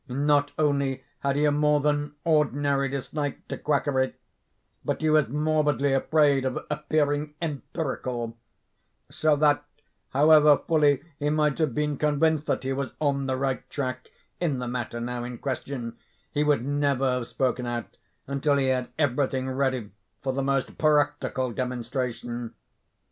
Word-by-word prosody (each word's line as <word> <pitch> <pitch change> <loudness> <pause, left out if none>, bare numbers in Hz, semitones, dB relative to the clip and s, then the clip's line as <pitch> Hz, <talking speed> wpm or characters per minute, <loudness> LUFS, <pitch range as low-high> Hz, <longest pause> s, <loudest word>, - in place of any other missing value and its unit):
Not 145 +2 +2
only 140 -3 +1 0.2
had 140 -1 0
he 150 +1 +2
a 150 - +4
more 150 0 +3
than 145 0 0
ordinary 145 -3 +2
dislike 140 +1 -4
to - - -2
quackery, 140 -3 +1 0.7
but - - -2
he 155 - +3
was 155 -6 +4
morbidly 150 -2 +1
afraid 140 0 +3
of 130 -1 -1
appearing 150 0 0
empirical; 130 -6 -3 0.8
so 155 -1 +2
that, 145 0 +3 0.5
however 150 +1 +6
fully 145 -4 +3 0.2
he 145 0 0
might 150 -1 +1
have 155 -7 +1
been 150 -1 0
convinced 150 +1 +1
that - - 0
he 135 0 -1
was 135 0 -3
on 140 -2 0
the 130 -1 0
right 135 0 -2
track 130 -2 -4 0.3
in 155 -6 0
the 125 0 -4
matter 120 -1 -3
now 120 0 -3
in 120 0 -6
question, 130 -3 -4 0.3
he 150 -1 +1
would 145 -5 +2
never 140 -1 +1
have 125 -2 -1
spoken 125 -2 -1
out, 120 -1 -5 0.3
until 140 +1 +1
he 135 -1 +2
had 125 -1 0
every 145 -2 +2
thing 130 0 -3
ready 130 -5 -1 0.3
for 135 -1 -1
the 135 - -1
most 135 -1 -1
practical 145 -4 +1
demonstration. 120 -1 -4
140 Hz, 150 wpm, -26 LUFS, 130-150 Hz, 0.8 s, however